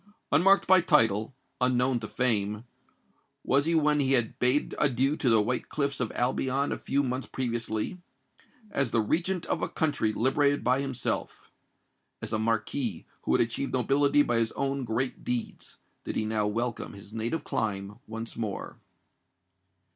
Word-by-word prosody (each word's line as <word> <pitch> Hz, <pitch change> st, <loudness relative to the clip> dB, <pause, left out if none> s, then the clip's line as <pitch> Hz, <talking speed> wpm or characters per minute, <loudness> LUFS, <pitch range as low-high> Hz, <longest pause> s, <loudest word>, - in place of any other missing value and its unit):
Unmarked 190 Hz, +7 st, +5 dB
by 185 Hz, 0 st, +6 dB
title, 115 Hz, -7 st, +2 dB, 0.3 s
unknown 125 Hz, 0 st, +2 dB
to 110 Hz, -, -6 dB
fame, 105 Hz, -3 st, +1 dB, 0.8 s
was 140 Hz, +2 st, +2 dB
he 165 Hz, +1 st, +1 dB
when 150 Hz, -1 st, +3 dB
he 135 Hz, -1 st, +2 dB
had 120 Hz, -4 st, +2 dB
bade 125 Hz, +4 st, +2 dB
adieu 135 Hz, 0 st, +2 dB
to 135 Hz, -, 0 dB
the 115 Hz, -1 st, +5 dB
white 125 Hz, +3 st, -2 dB
cliffs 140 Hz, -2 st, -1 dB
of 120 Hz, -3 st, -1 dB
Albion 130 Hz, +2 st, 0 dB
a -, -, -2 dB
few 140 Hz, +1 st, 0 dB
months 130 Hz, 0 st, -3 dB
previously:—as 130 Hz, -, -4 dB
the 115 Hz, -, +1 dB
Regent 170 Hz, -, 0 dB
of -, -, -2 dB
a -, -, -1 dB
country 145 Hz, -8 st, 0 dB
liberated 140 Hz, +5 st, +2 dB
by 130 Hz, +2 st, +2 dB
himself—as 135 Hz, -4 st, -6 dB
a 110 Hz, -, +1 dB
Marquis 115 Hz, -1 st, -1 dB, 0.2 s
who -, -, +2 dB
had -, -, +2 dB
acquired 135 Hz, +4 st, -4 dB
nobility 140 Hz, +3 st, +3 dB
by 120 Hz, -3 st, 0 dB
his 115 Hz, -1 st, +1 dB
own 135 Hz, -1 st, -2 dB
great 120 Hz, +3 st, -2 dB
deeds, 120 Hz, -2 st, -4 dB, 0.3 s
did -, -, -5 dB
he 110 Hz, -, 0 dB
now 110 Hz, -1 st, 0 dB
welcome 115 Hz, +2 st, -3 dB
his 100 Hz, +1 st, -11 dB
native 115 Hz, +8 st, -2 dB
clime 100 Hz, 0 st, -3 dB
once 115 Hz, +1 st, -6 dB
more. 110 Hz, -4 st, -5 dB
125 Hz, 155 wpm, -28 LUFS, 115-140 Hz, 0.8 s, by